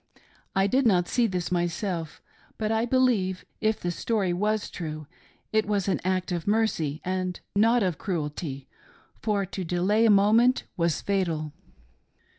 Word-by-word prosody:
I 195 0 +3
did 255 +5 +3
not 180 -4 +3
see 240 -2 +2
this 180 -4 -3
myself, 175 -1 -2 0.3
but 215 0 -1
I 225 +1 +1
believe, 230 -8 +1
if 215 0 +1
the 175 - -2
story 195 -1 0
was 210 +3 -1
true, 155 -3 -6 0.5
it 220 -1 +2
was 205 -3 0
an 195 - 0
act 185 0 -1
of 175 0 -3
mercy 200 -9 0
and 185 -1 -2 0.2
not 225 +3 +4
of 180 -5 -1
cruelty, 150 -6 -4 0.5
for 205 -3 0
to 190 0 -5
delay 185 +6 +2
a - - +4
moment 220 +5 +4
was 170 -2 0
fatal.. 165 -7 -1
190 Hz, 150 wpm, -26 LUFS, 175-215 Hz, 0.5 s, not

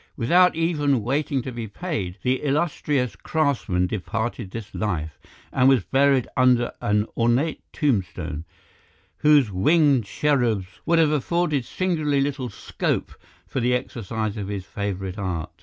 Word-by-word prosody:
Without 175 +9 +4
even 145 -7 +1
waiting 135 +1 0
to 130 - -5
be 115 -2 -5
paid, 105 - -4
the 130 +1 +1
illustrious 145 -3 0
craftsman 135 - 0
departed 110 +2 -3
this 110 +1 -8
life, 80 -8 -3 0.3
and 130 0 +5
was 130 -7 +4
buried 135 0 +3
under 125 -2 +3
an 105 +1 +1
ornate 120 +7 +1
tombstone, 95 - -1 0.7
whose 145 -7 +4
winged 140 - +3
cherubs 120 -5 +1 0.2
would 170 - +4
have 160 -2 +4
afforded 150 -2 0
singularly 155 -5 0
little 135 -2 -1
scope 100 - -2 0.3
for - - -3
the 125 +1 +2
exercise 110 -3 -3
of 100 -2 -4
his 100 -2 -4
favourite 95 -1 -4
art. 90 -5 -3
125 Hz, 135 wpm, -24 LUFS, 105-145 Hz, 0.7 s, and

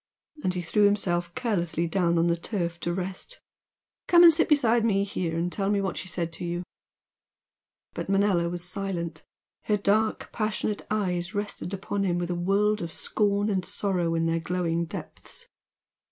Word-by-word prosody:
And 185 - 0
he 180 - -2
threw 205 +5 +3
himself 175 -4 +1
carelessly 175 -8 0
down 170 -1 +1
on 165 - +3
the 170 0 +3
turf 170 -1 -3
to 175 - -2
rest 190 - -4 0.7
"Come 345 0 +7
and 335 -1 +10
sit 325 - +2
beside 240 -6 +4
me 200 -3 +2
here 175 -4 -2
and 175 +1 -1
tell 195 +1 -1
me 205 -1 +2
what 190 -2 -1
she - - -5
said 170 -2 -3
to 165 - -7
you!" 175 +1 -2 1.3
But - - -5
Manella 195 -4 +3
was 175 0 -4
silent. 180 -4 -3 0.4
Her 210 - +2
dark, 215 +2 +1
passionate 215 -1 -2
eyes 185 -2 -1
rested 205 -3 -3
upon 200 0 -2
him 175 -3 +1
with 175 0 -2
a - - +1
world 200 +4 +1
of 170 -1 -4
scorn 205 +2 +1
and 190 -3 0
sorrow 180 -4 0
in 165 0 +1
their 165 0 +1
glowing 170 -1 -1
depths. - - -7
185 Hz, 175 wpm, -27 LUFS, 170-205 Hz, 1.3 s, and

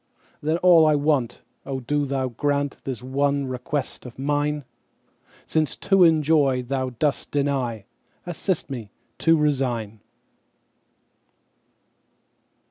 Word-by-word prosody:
Then 155 +2 +1
all 170 -3 +6
I 155 - +4
want—O 135 -2 -2
do 145 +3 -1
Thou 135 -1 -1
grantThis 140 -1 -2
one 140 +2 0
request 130 +2 -4
of 125 -2 -11
mine!—Since 145 +2 -4
to 195 -2 +3
enjoy 150 -5 +3
Thou 130 +1 -2
dost 150 0 0
deny, 135 -7 -1 0.4
Assist 175 -2 -3
me 115 -6 -6 0.3
to 165 0 +4
resign. 125 -8 -1
140 Hz, 95 wpm, -24 LUFS, 130-150 Hz, 0.4 s, all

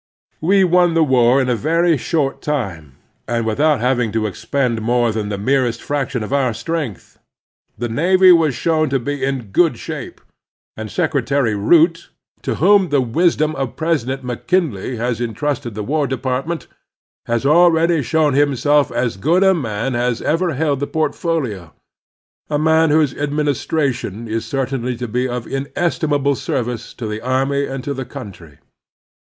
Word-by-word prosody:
We 190 +4 +4
won 175 -1 +3
the 165 - +4
war 130 -2 +4
in 130 - 0
a 125 - +1
very 165 +6 +2
short 140 0 -1
time, 95 - -4 0.3
and 115 -1 -1
with 110 +3 -2
out 150 -4 +3
having 125 -3 +1
to 110 -1 0
expend 115 +3 -1
more 120 +1 +1
than 105 -1 -3
the 100 - -3
merest 120 +1 0
frac 140 0 -2
tion 125 -5 -3
of 120 - -5
our 130 -5 +1
strength. 155 - -5 0.6
The 120 - -2
navy 185 +9 +4
was 160 -6 +4
shown 155 +4 +1
to 135 - +1
be 145 +3 -4
in 130 -6 -3
good 160 - +3
shape; - - -7 0.6
and 110 0 -6
Secretary 140 -7 0
Root, 165 - +3 0.3
to - - -2
whom 190 +2 +4
the 145 -1 +2
wisdom 155 +5 +1
of 135 -2 -4
President 135 -5 -1
McKinley 125 - -1
has 120 0 -2
intrusted 120 0 -3
the 105 - -4
War 145 +5 0
Department, 130 +5 -3 0.6
has 120 +2 -1
already 165 +1 +4
shown 150 +2 +1
himself 145 +1 +2
as 120 -5 -1
good 165 - +2
a 190 0 +5
man 120 - -2
as 120 0 0
ever 165 0 0
held 145 -1 0
the 145 - -2
portfolio 150 - -2 0.4
— - - -57
a 150 - 0
man 160 +1 +3
whose 150 -3 +3
administration 145 - -2
is 110 +1 -3
certainly 130 -2 -2
to 120 0 -4
be 125 +3 -1
of 120 -1 -4
inesti 150 +4 -2
mable 140 -1 +2
service 120 -2 -4
to 120 - -6
the 105 0 -4
army 135 +3 0
and 135 -1 -5
to 140 - -3
the 135 -1 -4
country. 100 - -11
135 Hz, 165 wpm, -18 LUFS, 120-155 Hz, 0.6 s, a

